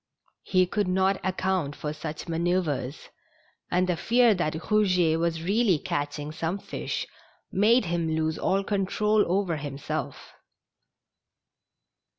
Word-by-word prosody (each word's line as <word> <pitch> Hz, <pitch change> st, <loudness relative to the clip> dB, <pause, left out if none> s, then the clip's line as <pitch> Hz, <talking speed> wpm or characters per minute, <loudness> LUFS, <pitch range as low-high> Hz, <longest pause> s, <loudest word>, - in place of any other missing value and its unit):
lie 185 Hz, -1 st, +5 dB
could 205 Hz, +2 st, -1 dB
not 190 Hz, +1 st, +2 dB
account 185 Hz, -5 st, -1 dB
for 150 Hz, 0 st, -4 dB
such 155 Hz, +1 st, -6 dB
manoeuvres, 165 Hz, -5 st, -1 dB, 0.6 s
and 180 Hz, +1 st, +2 dB
the 180 Hz, -, +1 dB
fear 235 Hz, +6 st, +4 dB
that 175 Hz, -5 st, -1 dB
Rougetwas 170 Hz, -4 st, +1 dB
really 200 Hz, -2 st, +3 dB
catching 145 Hz, +1 st, -3 dB
some 165 Hz, +4 st, -2 dB
fish -, -, -4 dB, 0.5 s
made 215 Hz, +4 st, +4 dB
him 170 Hz, -1 st, -1 dB
lose 160 Hz, 0 st, -1 dB
all 195 Hz, +1 st, +1 dB
control 210 Hz, +2 st, +1 dB
over 185 Hz, -4 st, +1 dB
himself. 145 Hz, -1 st, -5 dB
180 Hz, 115 wpm, -27 LUFS, 160-195 Hz, 0.6 s, lie